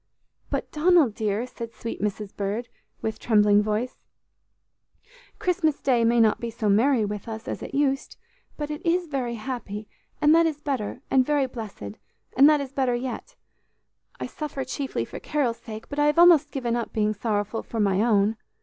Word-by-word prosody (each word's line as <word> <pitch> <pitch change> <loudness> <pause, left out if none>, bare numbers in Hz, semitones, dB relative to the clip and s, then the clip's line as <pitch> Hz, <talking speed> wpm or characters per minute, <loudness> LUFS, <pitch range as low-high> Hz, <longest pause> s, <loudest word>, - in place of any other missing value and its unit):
"But, - - -3
Donald, 310 - +4
dear," 210 +2 -1
said 235 -2 -8
sweet 230 - -6
Mrs. 210 0 -3
Bird, 205 +4 -3 0.3
with 220 - -2
trembling 210 -2 +4
voice, 215 +4 -2 1.4
"Christmas 345 -5 0
day 245 -4 +2
may 235 +1 +3
not 220 -2 +4
be 235 - -3
so 220 -2 -2
merry 230 +3 +3
with 205 +1 -5
us 220 0 -6
as - - -4
it - - -6
used, 275 -1 0 0.4
but 300 0 -4
it 300 - -6
is 350 +1 +1
very 260 -6 -3
happy, 215 -3 -5 0.3
and 300 +1 +5
that 335 0 +5
is 305 -2 -3
better, 260 -4 -3
and 265 -1 +5
very 290 0 +1
blessed, 210 - -8 0.4
and 275 +3 +8
that 300 -2 +4
is 270 -2 -6
better 260 -3 +1
yet. 260 - -5 0.8
I - - -3
suffer 295 -3 -5
chiefly 270 +1 -3
for - - -8
Carol's 265 -6 -1
sake, 220 -1 -9
but 290 - -5
I 295 - +4
have 295 +2 +2
almost 335 -4 +7
given 245 -5 -2
up 235 -1 -3
being 215 -1 +1
sorrowful 210 0 -2
for 230 - -6
my 200 -2 +2
own. 215 -1 +3
240 Hz, 180 wpm, -25 LUFS, 215-285 Hz, 1.4 s, and